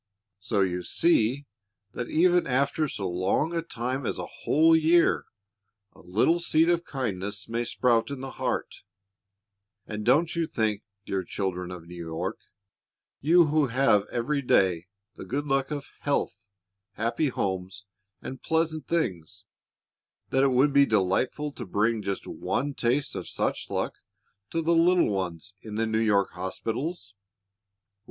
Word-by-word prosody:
So 100 +1 0
you 90 -2 0
see 140 - +2 0.5
that 120 +3 -5
even 175 +2 +3
after 140 +4 +1
so 100 -7 -4
long 95 - 0
a 165 - +1
time 130 -3 -4
as - - -2
a - - -4
whole 160 +2 +3
year, 165 +2 +4 0.7
a - - -20
little 110 - +2
seed 165 -1 +3
of 170 -1 +2
kindness 105 -6 -4
may 115 +1 -1
sprout 120 0 +1
in 140 -2 -5
the 135 0 -6
heart; - - -3 1.1
and 105 -1 -5
don't 155 +10 +3
you 165 -1 0
think, 110 -5 -1 0.2
dear 95 -1 -2
children 90 -1 -3
of 90 -2 -8
New 85 0 -8
York, 80 0 -4 0.8
you 170 +4 +5
who 150 -1 +2
have 115 -5 +3
every 140 +5 -1
day 90 -8 +2 0.3
the - - -7
good 145 +3 -3
luck 135 -1 0
of 145 -2 -5
health, 140 -6 -2 0.5
happy 115 +9 0
homes, 95 -5 -3 0.4
and 130 - -7
pleasant 160 -2 0
things, 100 - -2 0.9
that 135 - +3
it - - +5
would 135 +3 +3
be 140 0 +6
delightful 110 +9 +1
to 130 - -8
bring 110 +3 0
just 100 -1 -3
one 145 +3 -2
taste 130 +3 0
of - - -5
such - - -2
luck - - -2 0.5
to 165 - -1
the 170 +2 +3
little 170 -5 +4
ones 95 -1 -4
in 110 -2 -8
the 115 +1 +1
New 110 0 0
York 105 -3 +2
hospitals? 110 - -4
120 Hz, 150 wpm, -27 LUFS, 100-150 Hz, 1.1 s, be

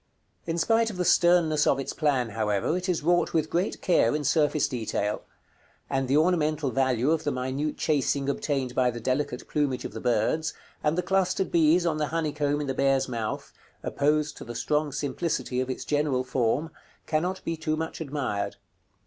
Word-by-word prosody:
In 165 0 -1
spite 225 +7 +3
of 205 - -7
the 180 - 0
sternness 170 -4 +4
of 135 - +4
its 135 - -4
plan, 135 -6 +1
however, 105 - 0
it 185 +1 -3
is 170 -4 0
wrought 175 +2 +2
with 155 -1 +1
great 180 +4 -1
care 150 -8 +3
in 150 - -2
surface 150 +1 +2
detail; 110 -4 -2 0.7
and 135 -1 0
the 135 +3 +3
ornamental 155 -4 +2
value 130 +1 +2
of 160 -1 +1
the 145 - 0
minute 130 +4 -2
chasing 140 -2 0
obtained 140 -3 -1
by 125 -1 +3
the 120 -1 -5
delicate 130 +1 -2
plumage 140 -4 -1
of - - -6
the - - -6
birds, 125 +7 0 0.3
and 150 +2 +1
the 180 - +1
clustered 190 0 +1
bees 170 +1 +4
on 160 -2 +1
the 150 -1 0
honeycomb 150 -2 -1
in 150 - -2
the 135 - -2
bear's 135 0 +2
mouth, 115 -4 -4 0.3
opposed 150 +1 +1
to - - -8
the 120 0 -8
strong 150 +4 0
simplicity 140 -2 -2
of 130 - -3
its 130 - -4
general 145 -3 +1
form, 130 +5 0 0.3
cannot 175 +4 -1
be 165 - -1
too 155 -1 -2
much 160 +1 -4
admired. 130 -10 -2
150 Hz, 185 wpm, -27 LUFS, 130-160 Hz, 0.7 s, sternness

